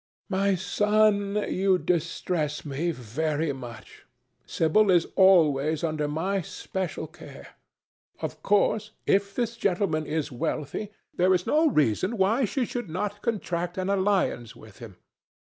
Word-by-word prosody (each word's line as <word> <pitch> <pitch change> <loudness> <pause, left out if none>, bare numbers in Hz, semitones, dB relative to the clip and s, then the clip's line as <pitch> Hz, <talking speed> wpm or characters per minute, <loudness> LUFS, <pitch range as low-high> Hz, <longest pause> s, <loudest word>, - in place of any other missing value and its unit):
"My 195 0 +2
son, 210 +1 +2
you 190 0 +2
distress 170 -3 -2
me 145 +4 -2
very 150 +3 -2
much. 120 -4 -11 0.4
Sibyl 195 +6 +2
is 175 -3 +4
always 160 -5 +4
under 155 -2 -1
my 185 +6 -1
special 180 0 -5
care. 160 +2 -12 0.7
Of - - -5
course, 210 +1 +1
if 200 0 +1
this 235 -1 -1
gentleman 185 -7 0
is 155 -1 -2
wealthy, 155 - -3 0.2
there 185 +1 +3
is 180 - -2
no 310 +1 +3
reason 155 - +1
why 220 +7 +2
she 250 +4 -1
should 240 -5 -5
not 205 +5 -3
contract 180 -6 -2
an 185 +1 -2
alliance 190 - 0
with 110 -3 -15
him. 110 -5 -10
180 Hz, 130 wpm, -26 LUFS, 155-200 Hz, 0.7 s, is